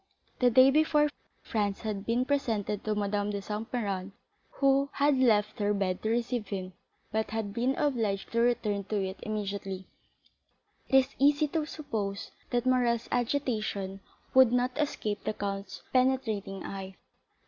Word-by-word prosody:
The 250 Hz, -, +5 dB
day 260 Hz, +3 st, +7 dB
before 300 Hz, 0 st, +3 dB, 0.3 s
Franz 205 Hz, -3 st, -1 dB
had 210 Hz, -3 st, -4 dB
been 240 Hz, +2 st, +2 dB
presented 225 Hz, -8 st, -1 dB
to 215 Hz, -1 st, 0 dB
Madame 205 Hz, 0 st, 0 dB
de 205 Hz, -1 st, -2 dB
Saint 210 Hz, +3 st, -5 dB
Méran, 200 Hz, -5 st, -2 dB, 0.4 s
who 275 Hz, 0 st, +3 dB
had 285 Hz, 0 st, +3 dB
left 215 Hz, -4 st, +3 dB
her 205 Hz, 0 st, +1 dB
bed 185 Hz, -2 st, -1 dB
to 220 Hz, -, -1 dB
receive 235 Hz, -1 st, -1 dB
him, 185 Hz, -1 st, -5 dB, 0.4 s
but 220 Hz, 0 st, -1 dB
had 215 Hz, -2 st, -3 dB
been 250 Hz, +4 st, +1 dB
obliged 225 Hz, -9 st, 0 dB
to 230 Hz, -, +1 dB
return 220 Hz, -4 st, +1 dB
to 215 Hz, -, -3 dB
it 190 Hz, +1 st, -6 dB
immediately 200 Hz, -3 st, -4 dB, 1.0 s
after. 265 Hz, -, +6 dB
It 265 Hz, -, +6 dB
is 270 Hz, -, -22 dB
easy 290 Hz, +2 st, +4 dB
to 310 Hz, 0 st, -1 dB
suppose 210 Hz, -11 st, -4 dB, 0.2 s
that 245 Hz, 0 st, 0 dB
Morrel's 245 Hz, -2 st, +2 dB
agitation 220 Hz, -6 st, -1 dB, 0.3 s
would 260 Hz, -2 st, +7 dB
not 250 Hz, +1 st, +1 dB
escape 220 Hz, -8 st, -2 dB
the -, -, -1 dB
count's 195 Hz, -1 st, -5 dB
penetrating 225 Hz, -7 st, +1 dB
eye. 195 Hz, -1 st, -6 dB
220 Hz, 155 wpm, -29 LUFS, 200-255 Hz, 1.0 s, day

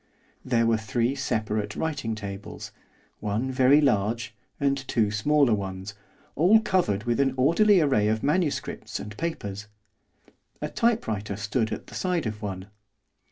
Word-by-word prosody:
There 120 Hz, -2 st, +2 dB
were 115 Hz, -1 st, +2 dB
three 115 Hz, +4 st, 0 dB
separate 110 Hz, -6 st, -2 dB
writing 135 Hz, -9 st, -2 dB
tables, 100 Hz, -2 st, -7 dB, 0.5 s
one 110 Hz, +5 st, -2 dB
very 130 Hz, +3 st, +5 dB
large 115 Hz, -4 st, +1 dB, 0.3 s
and 140 Hz, -1 st, +2 dB
two 110 Hz, -3 st, +1 dB
smaller 135 Hz, +4 st, +3 dB
ones, 95 Hz, -1 st, -4 dB, 0.4 s
all 185 Hz, +9 st, +6 dB
covered 175 Hz, -, 0 dB
with 120 Hz, +1 st, 0 dB
an 135 Hz, -1 st, +2 dB
orderly 180 Hz, +9 st, +5 dB
array 130 Hz, -9 st, +2 dB
of 110 Hz, +1 st, 0 dB
manuscripts 150 Hz, +1 st, -1 dB
and 105 Hz, 0 st, -8 dB
papers. 105 Hz, -10 st, -4 dB, 0.9 s
A -, -, -3 dB
typewriter 110 Hz, -, 0 dB
stood 105 Hz, +2 st, -1 dB
at -, -, -5 dB
the -, -, -14 dB
side 180 Hz, -5 st, -1 dB
of 105 Hz, -1 st, -4 dB
one. 95 Hz, -1 st, -5 dB
115 Hz, 140 wpm, -26 LUFS, 105-140 Hz, 0.9 s, all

